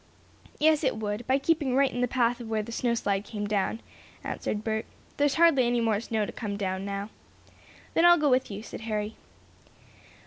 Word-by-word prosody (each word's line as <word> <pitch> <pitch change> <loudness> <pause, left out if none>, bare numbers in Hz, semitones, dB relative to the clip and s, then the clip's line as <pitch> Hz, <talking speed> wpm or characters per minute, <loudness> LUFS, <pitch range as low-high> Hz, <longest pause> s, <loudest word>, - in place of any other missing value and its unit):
"Yes, 310 0 +3
it 265 - +1
would, 215 +2 -4
by 260 +1 +3
keeping 280 -3 +1
right 275 0 +3
in 245 - -3
the 250 - +2
path 245 0 +1
of 235 - -7
where 220 -1 0
the 230 - -8
snow 235 0 0
slide 200 -3 -1
came 210 -1 -5
down," 205 +2 -1 0.4
answered 210 0 -3
Bert. 220 0 -2 0.3
"There's 290 -1 +2
hardly 320 -7 +5
any 240 0 +1
more 225 -3 +1
snow 220 -1 -1
to - - -6
come 205 -3 -4
down, 190 -1 -2
now." 200 +1 -4 0.8
"Then 330 - +3
I'll 345 0 +8
go 300 -3 +2
with 255 +1 +2
you," 205 +1 -6
said - - -8
Harry. 215 -1 -3
230 Hz, 200 wpm, -27 LUFS, 210-260 Hz, 0.8 s, I'll